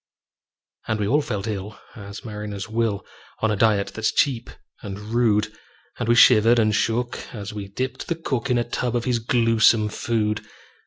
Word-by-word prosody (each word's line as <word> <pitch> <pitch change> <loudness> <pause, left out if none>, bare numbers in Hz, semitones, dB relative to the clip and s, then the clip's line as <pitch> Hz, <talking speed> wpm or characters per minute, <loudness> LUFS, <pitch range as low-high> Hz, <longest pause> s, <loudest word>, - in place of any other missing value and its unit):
And 110 -1 -1
we 105 - 0
all 145 +7 +3
felt 105 -7 -4
ill 105 -1 -5 0.2
as 100 -1 -9
mariners 105 -1 -6
will, 110 -2 -1 0.4
On 110 - +3
a - - +1
diet 105 -1 +2
that's 110 -1 0
cheap 125 -4 +1 0.3
and 100 -2 -6
rude; 110 -1 +1 0.4
And - - -2
we 120 - +5
shivered 115 0 +6
and 110 -2 +3
shook 120 +3 0 0.2
as 105 -1 -6
we 100 -2 -6
dipped 130 +7 -4
the 170 - -1
cook 140 -6 -3
In 125 - +3
a 120 - +2
tub 120 +1 -2
of 120 - -1
his 125 -2 +1
gluesome 115 -2 +3
food. 105 -1 -1
110 Hz, 175 wpm, -23 LUFS, 105-120 Hz, 0.4 s, shivered